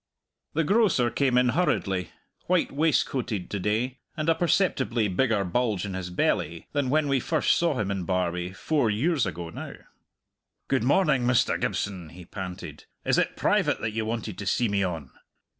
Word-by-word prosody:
The 165 - +1
grocer 185 - +3
came 130 +1 +2
in 125 0 +4
hurriedly, 100 - 0 0.4
white 180 -1 +2
waistcoated 135 - 0
to 100 - -2
day, 115 +7 -1 0.2
and 155 +1 0
a - - +6
perceptibly 135 - +1
bigger 105 +2 +1
bulge 105 0 0
in 100 - -5
his 95 -1 -4
belly 85 -1 -1
than 145 -3 0
when 150 +2 +2
we 135 -1 +2
first 160 +5 +2
saw 170 -5 +1
him 100 -3 -1
in 95 -2 -2
Barbie, 90 -1 -1
four 140 +5 0
years 130 - +1
ago 85 -2 -5
now. - - -7 0.9
"Good 130 -4 +1
morning, 140 -2 +3
Mr. 125 -1 +2
Gibson," 95 -6 -2
he 90 +2 -12
panted. 90 -1 -7 0.2
"Is - - +3
it - - -1
private - - +2
that 110 - -1
ye 110 - -1
wanted 110 -3 -4
to 100 - -5
see 120 +4 +2
me 100 -1 0
on?" 80 -8 -4
115 Hz, 175 wpm, -26 LUFS, 95-140 Hz, 0.9 s, a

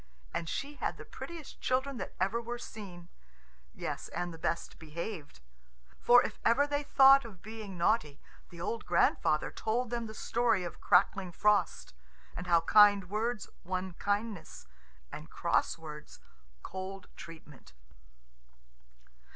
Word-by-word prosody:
And 165 - -3
she 285 - -4
had - - -2
the - - -10
prettiest 335 -4 -9
children 265 +1 0
that 190 - -6
ever 195 +6 +1
were 240 +1 -5
seen 185 -7 -10 0.6
yes, - - -5
and 175 -1 -4
the 165 - -11
best 170 0 -3
behaved. 160 - -7 0.6
For 245 +1 +6
if - - -5
ever 260 +5 +4
they 290 0 -1
thought 275 -1 +7
of 200 -7 -12
being 215 -3 -8
naughty, 170 -5 +1 0.3
the 170 - -12
old 220 +6 -3
grandfather 170 -3 +2
told 235 +2 -2
them 235 -1 -2
the 215 - -9
story 230 -5 +1
of 175 - -7
crackling 185 0 +3
Frost, 210 - +1 0.4
and 180 - -6
how 170 -1 +5
kind 200 +1 +6
words 215 0 -1 0.2
won 185 0 -3
kindness, 205 - -3 0.5
and - - -8
cross - - 0
words 150 -2 -10 0.4
cold 190 +1 -6
treatment. 155 - -12
200 Hz, 135 wpm, -31 LUFS, 170-235 Hz, 0.6 s, thought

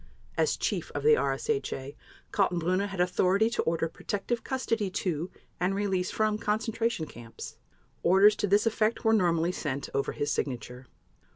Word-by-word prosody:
As - - +1
Chief - - -2
of - - -2
the 455 +1 +6
RSHA, 410 - -1 0.4
Kaltenbrunner 185 0 +1
had 195 -2 -7
authority 185 +4 +3
to 240 - 0
order 165 0 0
protective 205 +7 -3
custody 230 -6 -1
to 175 -2 -2 0.3
and 185 +2 +1
release 195 -2 0
from 215 -1 0
concentration 225 -3 -1
camps. 120 -5 -10 0.4
Orders 195 +4 +6
to 205 - 0
this 205 +3 +3
effect 225 +1 +1
were 225 - +5
normally 175 -4 +2
sent 140 -6 -3
over 140 - 0
his 145 0 -1
signature. 125 -1 -4
190 Hz, 150 wpm, -29 LUFS, 165-215 Hz, 0.4 s, the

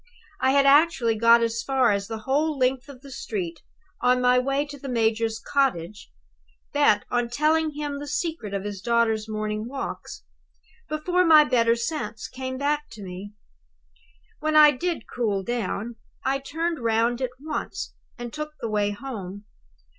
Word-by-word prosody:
I 260 - +2
had 275 +1 +4
actually 275 -5 +4
got 230 +1 +5
as 230 0 -1
far 260 -2 +2
as 200 -1 -1
the 225 - -4
whole 290 +5 0
length 255 +1 0
of 260 -3 -12
the 275 -1 -12
street 180 -9 -5 0.4
on 250 0 +3
my 250 0 +4
way 275 +3 0
to 285 -1 -10
the 275 - -7
major's 225 -1 0
cottage, 210 - -1 0.6
bent - - +3
on 240 -1 0
telling 310 +4 +1
him 290 -1 -4
the 290 - -7
secret 315 - -3
of 200 -1 -3
his 205 -2 -5
daughter's 225 -1 +1
morning 215 0 -3
walks, 270 +2 -6 0.7
before 355 +4 +1
my 315 -3 +8
better 235 -4 +3
sense 235 -3 -4
came 260 0 -5
back 295 +2 0
to 215 -2 -9
me. 190 +2 -8 1.1
When 310 0 -1
I 300 -1 +9
did 340 +5 -3
cool 210 -5 -1
down, 235 0 -3 0.3
I 270 +1 +1
turned 325 +4 -3
round 230 +1 +1
at 255 - 0
once, 305 +2 -5 0.2
and 240 -1 -7
took 305 0 -5
the 230 - -3
way 205 -1 +1
home. 205 -3 -7
250 Hz, 160 wpm, -25 LUFS, 220-285 Hz, 1.1 s, I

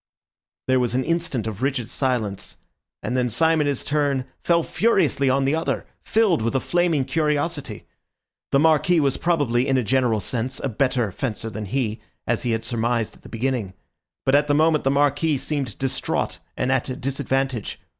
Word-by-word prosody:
There 130 0 +3
was 125 -1 0
an 130 - +1
instant 165 - -1
of 110 -1 -5
rigid 130 -4 0
silence, 120 -7 -2 0.5
and 125 - -2
then 125 -1 +1
Syme 160 +7 +3
in 145 - +1
his 140 -3 -1
turn 145 -3 0 0.2
fell 170 -1 +3
furiously 170 - +2
on 135 +1 +2
the 135 - +2
other, 160 +1 -1 0.2
filled 215 - +2
with 115 +4 -1
a - - +4
flaming 170 -3 +1
curiosity. 150 -4 -1 0.7
The - - +4
Marquis 160 +3 +4
was 140 -3 +1
probably, 145 -7 +1
in 135 - +2
a 125 - +1
general 125 -2 +2
sense, 125 +4 -3
a 135 - -2
better 125 -2 0
fencer 115 +2 -3
than 105 0 -5
he, 110 0 -2 0.2
as 120 - 0
he 125 - -2
had 115 -1 -1
surmised 115 -1 -1
at - - -20
the - - -13
beginning, 115 -5 -2 0.5
but 135 - +2
at 145 +1 +4
the 145 - +2
moment 155 -1 +3
the - - +4
Marquis 145 +2 +2
seemed 140 -1 -3
distraught 135 -1 -2 0.2
and 125 - 0
at 130 0 0
a 130 - -3
disadvantage. 135 -3 -2
135 Hz, 185 wpm, -23 LUFS, 120-150 Hz, 0.7 s, a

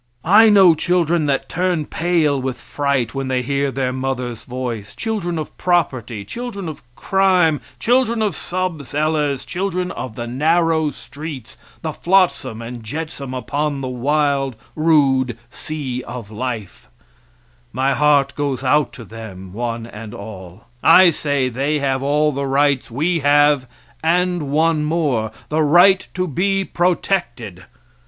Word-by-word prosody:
I 215 +6 +7
know 195 -5 +7
children 170 -1 +1
that 140 -1 0
turn 175 -3 -1
pale 160 -5 +1
with 130 -1 -3
fright 140 -4 -1
when 135 -1 -3
they 130 -1 0
hear 140 +2 0
their 130 -1 -2
mother's 125 -3 -3
voice; 120 -5 -5
children 195 -7 -2
of 155 - -6
property; 130 - 0
children 225 - -6
of 155 - -7
crime, 185 -6 +2 0.2
children 235 - +2
of 205 -6 -1
sub 180 -4 -3
cellars; 150 -1 -1
children 180 -1 -2
of 125 -4 -6
the 120 - -4
narrow 160 +5 +2
streets, 145 -3 -9 0.3
the 160 -1 -3
flotsam 170 - +1
and 120 +1 -7
jetsam 140 +1 -5
upon 145 +3 -2
the 130 - -3
wild, 135 +1 0 0.2
rude 135 -6 +2
sea 135 -5 -5
of 115 -4 -8
life 110 - -5 0.8
my 135 +3 +1
heart 145 -2 +3
goes 140 -3 -2
out 145 +3 +2
to 115 - -10
them 95 -5 -10
one 115 +1 -3
and 110 -2 -9
all; 100 -2 -10 0.2
I 175 +2 +7
say 145 -4 -1
they 135 +5 -1
have 135 -2 0
all 150 +2 +2
the 140 0 -3
rights 140 -1 +2
we 160 +8 0
have 145 -2 +4 0.4
and 175 -2 +1
one 155 +1 +2
more 150 -8 0 0.2
the 155 +1 +1
right 175 +6 +5
to 185 0 -1
be 195 +5 0
protected. 145 - -1
145 Hz, 140 wpm, -19 LUFS, 125-170 Hz, 0.8 s, I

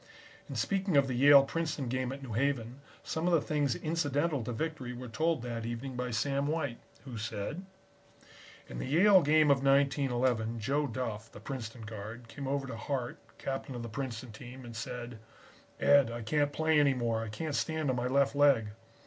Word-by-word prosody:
In - - -5
speaking 195 -5 +1
of 140 - +5
the 130 - -2
Yale 140 +2 +8
Princeton 155 -2 -2
game 130 +1 -1
at 135 +1 -7
New 120 -5 -6
Haven, 130 0 -1 0.2
some 160 +2 -2
of 180 - +3
the 165 - +6
things 145 -4 0
incidental 150 -3 0
to 120 - -4
victory 130 0 -3
were 125 +1 -7
told 155 +3 0
that 115 -2 -4
evening 120 +3 -5
by 125 0 -2
Sam 140 +4 0
White, 145 -6 -2 0.3
who 120 -5 -6
said: 120 - -4 1.0
"In - - -7
the - - -4
Yale 185 +7 +6
game 150 0 +4
of 135 -1 +2
1911, 130 -4 +2
Joe 140 +6 0
Duff, 115 -3 -4
the - - -11
Princeton 115 0 -6
guard, 110 +2 -8
came 135 +4 -7
over 140 0 -1
to 120 -4 -6
Hart, 125 0 -3 0.2
Captain 135 0 -4
of 120 - -5
the 115 - -5
Princeton 120 0 -5
team, 125 +4 -10
and 115 -1 -9
said: 120 0 -6 0.6
"'Ed, 140 -4 +5
I 115 0 -5
can't 145 +4 +1
play 160 +1 +2
any 140 -2 +4
more. 115 -2 0
I 110 - -5
can't 150 +8 -4
stand 155 -2 0
on - - -1
my 125 0 -1
left 140 +2 +2
leg.' 140 -7 +4
130 Hz, 190 wpm, -31 LUFS, 120-145 Hz, 1.0 s, Yale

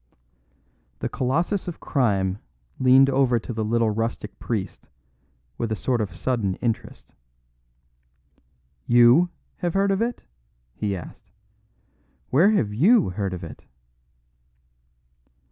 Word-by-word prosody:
The - - -3
colossus 165 +10 -1
of 175 - -6
crime 100 -7 0 0.4
leaned 130 +1 +6
over 135 -3 +2
to 115 - -5
the 110 0 -2
little 115 0 +1
rustic 115 -1 -4
priest 105 -5 -4 0.7
with 115 - -2
a - - +1
sort 120 +2 -1
of 100 -4 -4
sudden 105 -3 -1
interest. 115 -2 -4 1.7
"You 120 +9 +6 0.3
have 175 0 -3
heard 195 0 +2
of 195 - 0
it?" 235 +1 -2 0.5
he 100 -2 -2
asked. 90 - -11 1.0
"Where 165 +10 +5
have 115 - +1
you 190 - +4
heard 95 0 -3
of 90 - -8
it?" 80 - -10
120 Hz, 115 wpm, -24 LUFS, 105-150 Hz, 1.7 s, leaned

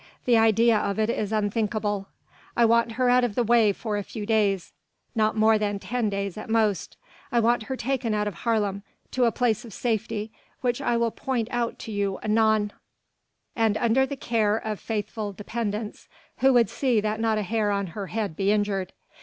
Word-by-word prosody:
The 245 - +4
idea 225 0 +4
of 200 -1 -2
it 220 +1 +1
is 210 -3 -2
unthinkable. 210 -1 -1 0.5
I 235 - +5
want 230 0 +3
her 250 +2 +1
out 250 0 +4
of 230 -4 -1
the 245 - +2
way 230 -2 +4
for 210 +1 -3
a 205 - -2
few 210 +1 -6
days, 205 -4 +1 0.4
not 220 -2 +1
more 220 0 +4
than 205 -1 -1
ten 235 +2 -2
days 200 0 -3
at 215 - -9
most. 220 -3 0 0.3
I 240 - +3
want 235 0 +2
her 265 - -2
taken 245 -3 -1
out 210 0 0
of 205 - -3
Haarlem, 205 0 -1 0.3
to 255 -1 +2
a 230 - +3
place 235 0 0
of 230 -4 -11
safety 220 -2 -2 0.3
which 245 -1 0
I 235 - +1
will 235 -1 +1
point 245 -3 -2
out 240 -1 -1
to 225 - -8
you 200 -2 -1
anon, 215 -1 +2 0.8
and 220 -2 +2
under 240 +3 +2
the 280 - -5
care 220 -4 +1
of 215 -2 -4
faithful 210 -1 -4
dependents 210 +1 -4 0.3
who 270 +1 +5
would 240 -2 +4
see 250 -5 +1
that 215 +1 -2
not 225 -1 +1
a 210 - 0
hair 215 +1 0
on 200 -1 0
her 200 -2 -5
head 210 -6 -3
be 195 +3 +1
injured. 205 -3 0
220 Hz, 195 wpm, -25 LUFS, 205-235 Hz, 0.8 s, I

